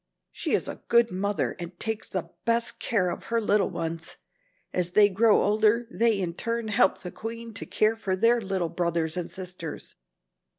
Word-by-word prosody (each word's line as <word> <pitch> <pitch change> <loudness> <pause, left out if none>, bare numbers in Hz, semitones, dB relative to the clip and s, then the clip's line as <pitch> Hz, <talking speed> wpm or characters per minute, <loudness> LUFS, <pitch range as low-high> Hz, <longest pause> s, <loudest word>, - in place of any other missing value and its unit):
She - - -3
is - - +1
a - - -6
good 235 -1 +4
mother 200 +2 -1
and 175 0 -8
takes 220 -1 -3
the 175 -2 -4
best 230 0 +2
of - - -30
care 190 -7 +1
of - - -7
her 230 0 0
little 210 -3 +2
ones. 165 -2 -5 0.6
As 180 -1 -1
they 205 0 +6
grow 215 +3 +4
older, 215 +3 +3
they 230 -3 +2
in 175 -3 -2
turn 230 +4 -2
help 190 -2 +3
the 180 - -6
queen 230 +1 -7
to 205 - -5
care 215 +1 +2
for 195 -4 -2
their 230 +4 +3
little 190 -4 -1
brothers 170 -2 -1
and 180 -2 -3
sisters. 180 -4 -7
200 Hz, 185 wpm, -27 LUFS, 180-225 Hz, 0.6 s, they